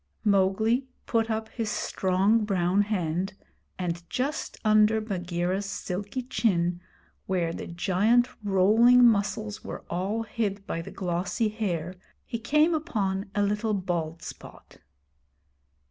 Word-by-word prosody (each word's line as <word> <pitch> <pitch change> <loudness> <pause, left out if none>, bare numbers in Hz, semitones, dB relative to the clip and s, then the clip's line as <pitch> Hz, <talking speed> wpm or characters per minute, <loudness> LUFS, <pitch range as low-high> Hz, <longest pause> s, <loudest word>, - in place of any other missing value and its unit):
Mowgli 215 +5 +2 0.2
put 225 -1 +1
up 220 0 -2
his 225 -3 -3
strong 195 +3 +1
brown 190 -1 +2
hand, 190 -2 -1 0.4
and 175 -2 -2
just 280 +5 -2
under 215 +1 +5
Bagheera's 185 -1 -2
silky 200 +5 -4
chin, 180 -8 0 0.5
where 175 -3 0
the - - -6
giant 200 +8 +2 0.2
rolling 220 +6 +5
muscles 210 -1 +1
were - - -7
all 200 +6 -1
hid 210 -3 -3
by 165 - -3
the - - -8
glossy 185 +5 -1
hair, 180 -6 -3 0.3
he 230 - -4
came 300 +8 +3
upon 200 - -1
a 205 - +2
little 210 +1 0
bald 170 -4 -3
spot. - - -11
205 Hz, 120 wpm, -27 LUFS, 180-225 Hz, 0.5 s, under